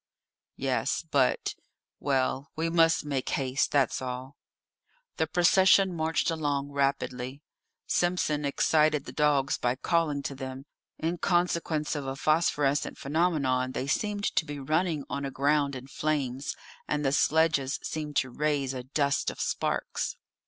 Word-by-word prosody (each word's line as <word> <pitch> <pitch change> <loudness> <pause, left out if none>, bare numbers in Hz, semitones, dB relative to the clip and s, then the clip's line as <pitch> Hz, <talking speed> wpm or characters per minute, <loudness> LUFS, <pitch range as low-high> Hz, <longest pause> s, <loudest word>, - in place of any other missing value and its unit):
"Yes; - - -1
but - - +2 0.5
well, 135 0 0
we 165 +1 -1
must 165 -2 +4
make 140 -3 -2
haste, 135 0 0
that's 135 -4 +2
all." 130 +2 -5 0.8
The 160 - +1
procession 185 +3 +4
marched 160 0 0
along 145 -3 -1
rapidly; 140 -1 -1 0.4
Simpson 175 -4 +1
excited 150 +1 +2
the - - -7
dogs 145 -3 +2
by 120 0 +1
calling 150 0 0
to 140 - -3
them; 130 0 -7 0.3
in 165 +2 -2
consequence 170 -4 0
of 145 -2 -4
a 135 - -3
phosphorescent 145 -1 +1
phenomenon 140 -5 0
they 130 - -2
seemed 205 +8 -1
to - - +3
be 145 -2 -6
running 155 +2 0
on 140 0 -4
a 140 - -2
ground 140 +1 +1
in 130 0 -7
flames, 140 -2 -2 0.3
and 150 -1 -1
the 135 - +3
sledges 150 -2 +2
seemed 150 -2 -4
to 130 -1 +1
raise 145 -1 0
a 130 - -4
dust 140 +2 0
of - - -8
sparks. - - -2
145 Hz, 140 wpm, -28 LUFS, 135-160 Hz, 0.8 s, must